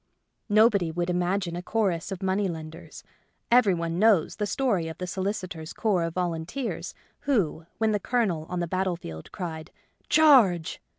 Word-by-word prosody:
Nobody 205 -4 +4
would 175 +2 -1
im 180 - 0
agine 180 -1 -1
a 175 - -4
chorus 190 -3 -1
of 190 0 -5
money 190 +1 +1
lenders. 160 -1 -8 0.5
Every 235 -6 +5
one 170 0 -3
knows 210 -6 +3
the 210 -1 -1
story 200 -6 0
of 160 - -7
the 180 - -4
solicitors' 185 -4 -4
corps 190 -6 +1
of 165 - -5
volunteers 175 +8 -3 0.2
who, 185 - 0
when 220 -1 +1
the 210 - +1
Colonel 195 -9 -1
on 180 -1 -2
the 175 - -2
battle 185 +1 -1
field 80 - -9
cried, 160 -3 -6 0.2
'* - - -42
Charge 240 - +4
180 Hz, 170 wpm, -26 LUFS, 165-210 Hz, 0.5 s, Every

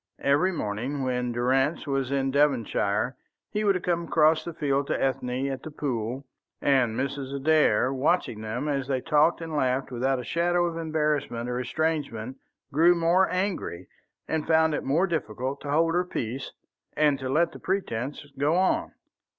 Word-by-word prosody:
Every 145 +7 +3
morning 130 - -3
when 125 -1 -1
Durrance 130 +6 +1
was 135 -3 -1
in 135 -1 0
Devonshire 125 -5 +1 0.4
he 210 - -1
would 195 -4 +2
come 170 -1 0
across 155 -1 +3
the 170 - -5
fields 140 -3 -1
to - - -1
Ethne 130 -1 -1
at 135 -1 -3
The - - -7
Pool, 130 -3 -3 0.3
and 125 -5 +2
Mrs. 140 0 -3
Adair, 140 -4 +3
watching 135 -5 0
them 110 +6 -3
as 140 -3 -1
they 135 -2 0
talked 155 +4 +2
and 165 -2 -5
laughed 130 -2 0
without 130 +2 0
a 125 - -5
shadow 175 +5 +1
of 170 -1 -2
embarrassment 150 -7 -1
or 125 0 -2
estrangement, 135 -4 -2 0.4
grew 170 +4 +5
more 170 +3 +3
angry, 180 - -2 0.4
and 160 -1 -2
found 160 -1 +4
it - - -2
more 155 +8 +2
difficult 130 - -3
to 145 - -6
hold 165 +3 +2
her 180 +1 +2
peace 130 -6 -4 0.5
and 145 -2 +3
let 155 +6 +1
the - - -11
pretence 145 - -3
go 150 +4 +2
on. 185 +1 +1
140 Hz, 165 wpm, -26 LUFS, 130-160 Hz, 0.5 s, grew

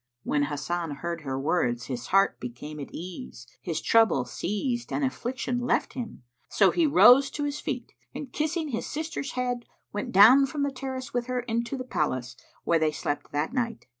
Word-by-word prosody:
When 145 -1 +1
Hasan 155 +2 -3
heard 170 +3 -4
her 135 -2 -3
words 125 -6 0
his 125 -3 -5
heart 195 +1 +3
became 125 +5 -7
at 140 - -6
ease, 180 - -8 0.2
his 160 -2 -2
trouble 225 - +4
ceased 240 - -3
and 285 - 0
affliction 250 -1 -2
left 245 - 0
him; 230 - -6 0.3
so 195 -2 +4
he 335 -3 +3
rose 275 -1 +7
to 290 - -4
his 290 0 -2
feet - - -4 0.2
and 265 -4 -8
kissing 315 +1 -1
his 230 - -3
sister's 310 -2 -4
head, 245 -1 -2 0.3
went 205 - -3
down 250 +8 +8
from 285 +1 -2
the 280 - 0
terrace 260 -1 -6
with 245 0 -1
her 250 -1 -1
into 235 +2 -2
the 255 - -4
palace, 130 - -2 0.3
where 165 - +3
they 155 -1 +2
slept 145 -1 -3
that 150 +9 -1
night. 235 -4 -2
230 Hz, 185 wpm, -27 LUFS, -, 0.3 s, down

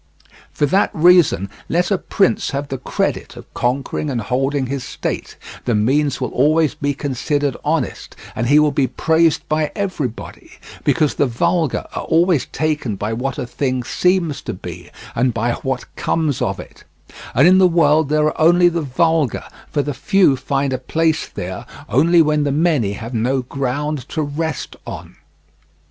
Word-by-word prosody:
For 145 - +1
that 190 +8 +2
reason, 170 - +4 0.2
let 175 +4 +1
a 195 - +3
prince 195 - +1
have 140 +1 -4
the 135 - -4
credit - - -2
of - - -13
conquering 135 +4 -1
and 125 -4 -1
holding 135 +4 -1
his 135 0 -4
state, - - -4 0.3
the 120 - +1
means 135 +7 +1
will - - -3
always 155 +3 +2
be 145 -1 -2
considered 145 0 -1
honest, - - -2 0.2
and 115 +2 -1
he 145 +4 +5
will 150 -1 +4
be 140 -1 +1
praised 160 +1 +1
by 155 0 0
everybody; 165 - -5 0.3
because 155 -3 +2
the 145 - +1
vulgar 165 +5 0
are - - -3
always 170 -3 +2
taken 150 -8 -2
by 105 +3 -3
what 130 +4 -3
a 130 - -3
thing 130 0 -2
seems 180 +2 0
to - - -5
be - - -9 0.2
and 125 0 +1
by 115 +1 0
what 130 +1 -3
comes 155 -5 -1
of - - -1
it; - - -12 0.5
and 140 +7 +6
in 185 +1 +6
the 185 - +6
world 160 -3 +3
there 150 0 +2
are 155 - -1
only 175 +2 +6
the 170 -1 -2
vulgar, 155 -1 +1 0.3
for 145 - 0
the 145 - -3
few 195 -4 +3
find 135 +1 -1
a 130 - -2
place 160 +4 0
there 90 +1 -6 0.2
only 165 +7 +4
when 150 -1 +1
the 145 - 0
many 145 - +1
have 115 +4 -7
no 125 +3 0
ground 140 +2 -3
to 155 - -2
rest 150 +2 -4
on. - - -8
145 Hz, 170 wpm, -19 LUFS, 130-160 Hz, 0.5 s, and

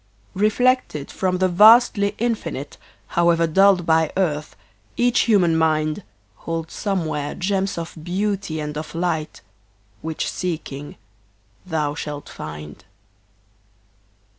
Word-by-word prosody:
Reflected 215 - +1
from 185 -1 -1
the 185 0 +2
vasty 205 +2 +6
Infinite, 175 - -3 0.3
However 170 -1 +3
dulled 190 +2 +4
by 160 -1 +3
earth, 155 -5 -1 0.4
each 245 0 +3
human 180 -6 +4
mind 155 +2 +1 0.4
Holds 165 -1 -5
somewhere 160 -7 -2
gems 195 0 -1
of 170 0 -5
beauty 185 -1 -2
and 150 0 -4
of 155 - -8
light 165 -3 -2 0.6
Which, 160 -1 -3
seeking, 155 -5 -5 0.7
thou 155 -4 -1
shalt 150 -1 -6
find. 75 +2 -9
170 Hz, 105 wpm, -22 LUFS, 155-195 Hz, 0.7 s, vasty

